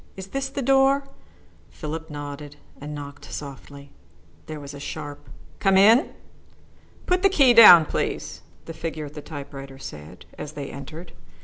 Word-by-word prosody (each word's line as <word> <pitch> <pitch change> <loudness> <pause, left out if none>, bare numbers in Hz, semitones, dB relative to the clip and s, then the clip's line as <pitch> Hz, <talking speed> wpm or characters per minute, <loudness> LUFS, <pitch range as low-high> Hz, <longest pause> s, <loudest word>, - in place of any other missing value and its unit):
Is 190 0 -8
this 275 +2 -3
the 275 0 -4
door?" 270 +1 +3 0.7
Philip 160 +1 -7
nodded 145 0 -8 0.3
and 150 +1 -6
knocked 140 -1 -9
softly. 140 0 -9 0.6
There 155 -1 -6
was 145 0 -9
a 140 - -9
sharp 145 0 -8 0.3
"Come 195 -1 +3
in!" 225 - +5 0.9
"Put 360 0 +1
the 390 - +5
key 275 -10 +5
down, 195 -8 +10
please," - - -4 0.2
the 165 - -7
figure 160 -1 -5
at 145 - -11
the 150 - -8
typewriter 140 -2 -9
said, 75 - -11
as 150 - -7
they 140 -2 -7
entered. 155 +5 -10
155 Hz, 150 wpm, -24 LUFS, 145-205 Hz, 0.9 s, down